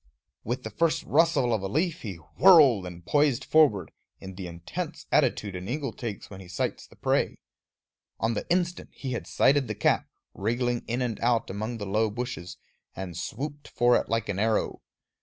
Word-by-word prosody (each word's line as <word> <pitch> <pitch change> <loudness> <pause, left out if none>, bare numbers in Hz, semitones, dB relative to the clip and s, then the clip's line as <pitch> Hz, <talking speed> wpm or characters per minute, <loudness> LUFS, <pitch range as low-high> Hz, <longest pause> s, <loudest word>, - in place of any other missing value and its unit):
With 120 +4 -3
the - - -6
first 165 0 +1
rustle 145 -6 +3
of 110 - 0
a 95 - -2
leaf 160 - -1
he 100 -5 -5
whirled 120 - +5
and 85 -1 -10
poised 145 -2 +2
forward, 145 -12 +4 0.3
in 95 0 -8
the 90 -1 -6
intense 85 0 -6
attitude 100 -3 +2
an 90 +1 -6
eagle 135 -2 -2
takes 110 -5 -6
when 95 -1 -10
he 90 - -12
sights 90 - -3
the - - -19
prey. - - 0 0.8
On 115 +1 +1
the 105 - -4
instant 175 -1 0
he 135 - -5
had 120 - -4
sighted 140 -1 +3
the - - -3
cap, - - +1 0.2
wriggling 120 +3 -1
in 120 +2 -1
and 115 -3 -3
out 115 -3 +1
among 110 +4 -4
the 105 - -5
low 105 +3 +1
bushes, 120 -5 -5 0.4
and 90 -2 -6
swooped 145 - -5
for 120 0 +3
it - - 0
like 115 -1 0
an 100 -2 -2
arrow. 110 +1 0
115 Hz, 185 wpm, -27 LUFS, 100-140 Hz, 0.8 s, whirled